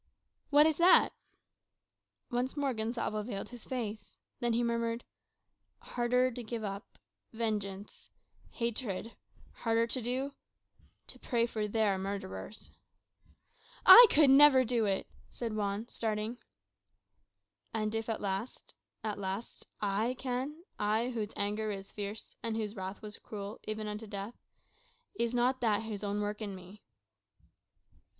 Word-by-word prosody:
"What 295 +1 +7
is 315 -2 +2
that?" 350 +2 +6 1.2
Once 250 +4 -1
more 280 -2 +1
Gonsalvo 220 -1 -2
veiled 205 -2 -5
his 245 -2 -11
face. 225 -4 -5 0.2
Then 240 -1 +1
he 235 +1 +2
murmured 235 0 -1 0.7
"Harder 250 +1 +1
to 245 +1 -6
give 230 -1 -5
up 200 +1 -6 0.4
vengeance, 210 -3 -3 0.4
hatred; 230 -2 -3 0.4
harder 230 0 +1
to 250 +2 0
do 260 +4 -2 0.7
to - - -6
pray 235 -2 +1
for 215 -3 -2
their 210 -2 +1
murderers." 195 - -6 1.1
"I 480 0 +12
could 290 -3 +6
never 270 -2 +8
do 235 -2 +1
it," 195 -1 0 0.2
said 230 -3 -4
Juan, 205 +1 -2
starting. 220 +1 -3 1.3
"And 215 -1 -1
if 225 0 -2
at 225 - -2
last 200 +4 -4 0.3
at 215 -2 -3
last 195 +3 -5
I 210 +5 0
can, 265 +6 -3 0.2
I, 215 +4 +1
whose 220 -4 -3
anger 210 +2 -1
was 195 -2 -5
fierce, 205 +1 -6
and 225 -1 -2
whose 215 -1 -3
wrath 190 +2 -6
was 210 -1 -7
cruel, 205 0 -7
even 215 0 -3
unto 210 +1 -5
death, 200 +2 -5 0.8
is 235 - -1
not 250 +2 +2
that 220 -2 +2
His 215 -2 -5
own 205 0 -1
work 210 +1 -3
in 200 -2 -4
me?" 185 +3 -12
220 Hz, 135 wpm, -32 LUFS, 205-240 Hz, 1.3 s, I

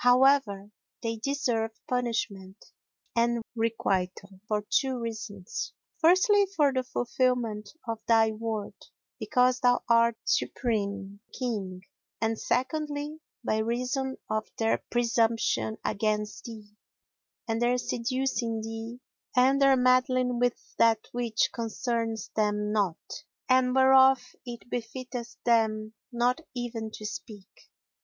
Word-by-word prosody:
However, 245 -5 +4 0.3
they 230 -1 -2
deserve 235 -3 -1
punishment 230 -6 -2 0.6
and 235 0 +2
requital 195 -4 -1
for 210 -1 -1
two 265 -2 +1
reasons: 215 -5 -5 0.3
firstly 375 +4 +5
for 290 -5 +3
the 260 - +1
fulfilment 245 -4 -1 0.2
of 225 -1 -2
thy 225 -1 +5
word, 220 -1 -4 0.5
because 250 -2 +2
thou 245 0 +3
art 235 -1 +4
the - - -29
supreme 200 -4 -1 0.2
King; 195 -7 -3 0.4
and 225 0 0
secondly, 295 +3 -2 0.2
by 215 - +1
reason 250 +4 -1
of 215 0 -1
their 225 -1 +1
presumption 230 - +1
against 210 0 -1
thee 215 -3 -9 0.8
and 225 0 -1
their 245 +1 +3
seducing 245 -2 -1
thee 225 +2 -6 0.4
and 265 +2 +4
their 275 -1 +6
meddling 255 -1 +3
with 245 -1 +2 0.2
that 225 -1 +4
which 235 -2 0
concerneth 230 -1 -2
them 210 -1 0
not 200 -6 +1 0.5
and 255 -1 +3
whereof 265 -1 +5
it 235 -3 -8
befitteth 245 0 -5
them 220 -2 +2 0.2
not 245 +5 +1
even 235 -2 -4
to 215 0 -9
speak. 210 -2 -9
235 Hz, 115 wpm, -28 LUFS, 215-255 Hz, 0.8 s, their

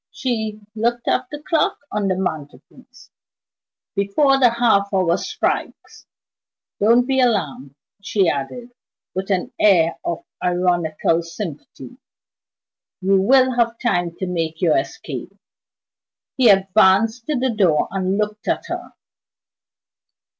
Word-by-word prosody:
She 220 -4 -3
looked 235 +2 -1
at 255 - +1
the 295 0 -8
clock 320 +1 +1
on 205 -1 -1
the 190 - +1
mantelpiece. 180 - -7 0.8
"Before 270 +8 +2
the 250 -2 +6
half 230 -4 +2
hour 185 -3 +2
strikes. - - -4 0.7
Don't 235 +4 +4
be 265 0 0
alarmed," 150 - -1 0.3
she 195 -2 +1
added, 235 - -3 0.4
with 190 +2 -4
an 185 -2 -1
air 170 -5 +3
of 170 - -3 0.2
ironical 175 -2 +1
sympathy; 165 - -8 1.0
"you 190 0 +2
will 260 +5 +4
have 230 -1 +1
time 175 -9 -1
to 190 - -4
make 165 -3 -3
your 165 -4 +3
escape." - - -5 1.0
He 250 -4 +4
advanced 200 +4 +3
to 300 -3 0
the 255 0 0
door, 175 -8 +2
and 190 0 -1
looked 210 0 -3
at - - -1
her. - - -6
200 Hz, 120 wpm, -20 LUFS, 175-235 Hz, 1.0 s, the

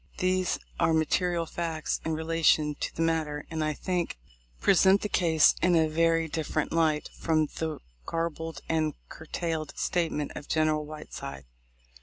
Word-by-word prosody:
These 185 -1 +1 0.2
are 165 - +3
the - - +4
material 170 +2 +1
facts 165 -2 -3
in 160 - -1
relation 160 -1 +2
to - - -5
the 165 - 0
matter, 155 -3 -1
and 160 -1 -1
I 155 0 0
think 175 - -2 0.4
present 195 +1 +5
the 210 - -2
case 165 -5 +4
in 180 -1 +4
a 160 -1 +4
very 165 +1 +2
dif 160 0 -3
ferent 155 - -1
light 160 -2 +1
from 155 -2 +2
the 160 -1 -2 0.3
garbled 165 -2 -3
and 155 -2 0
curtailed 160 -1 -4
statment 160 -4 -1
of 145 - -7
General 155 -1 +1
Whiteside. 70 - -8
160 Hz, 155 wpm, -28 LUFS, 155-165 Hz, 0.4 s, present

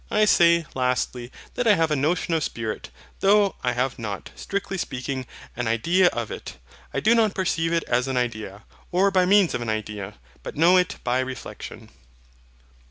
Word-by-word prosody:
I 215 0 +3
say, 170 -4 +5
lastly, 125 -1 -1 0.2
that 245 - -1
I 210 - +6
have 160 -2 +1
a - - +3
notion 160 +4 0
of 160 -2 +1
Spirit, 110 -4 -4 0.3
though 200 0 +4
I 125 -1 +1
have 125 +1 -1
not, 105 -4 -5
strictly 195 -1 -4
speaking, 130 -2 -4 0.3
an 120 -1 -2
idea 170 +12 +3
of 120 -8 -2
it. - - -8 0.3
I - - -1
do 220 - +4
not 220 -3 +2
perceive 165 -3 0
it 165 -1 +1
as 125 +2 0
an 130 -1 -1
idea, 110 -5 -3 0.3
or 195 +3 +3
by 185 -1 +3
means 200 -2 +4
of - - -2
an 120 - -3
idea, 105 -2 -4 0.3
but - - -8
know 170 +4 +6
it 180 -1 +2
by 125 +1 +1
reflexion. 130 0 -7
140 Hz, 180 wpm, -24 LUFS, 120-185 Hz, 0.3 s, I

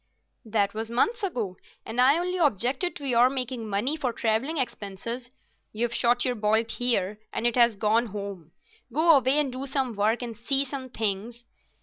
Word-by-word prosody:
"That 205 -2 0
was 220 +1 -4
months 445 - +1
ago, 235 - -3 0.3
and 230 +3 0
I 275 +5 +5
only 360 +1 -2
objected 270 - +1
to 285 - -5
your 245 0 +5
making 250 -4 -3
money 210 +9 0
for 270 -6 -2
travelling 230 +8 -1
expenses. 235 0 -4 0.4
You've 235 +2 -1
shot 240 +1 +2
your 250 - +1
bolt 220 0 +1
here 215 -5 +1
and - - -3
it 240 - +2
has 235 -2 +4
gone 220 +4 +1
home. 200 -6 -7 0.4
Go 320 +5 +5
away 270 +1 +3
and 295 -3 +1
do 265 +2 -4
some 265 -3 -1
work, 220 +4 0
and 235 -2 -6
see 270 +5 +2
some 265 -1 -6
things." 220 +1 -2
240 Hz, 180 wpm, -26 LUFS, 220-265 Hz, 0.4 s, I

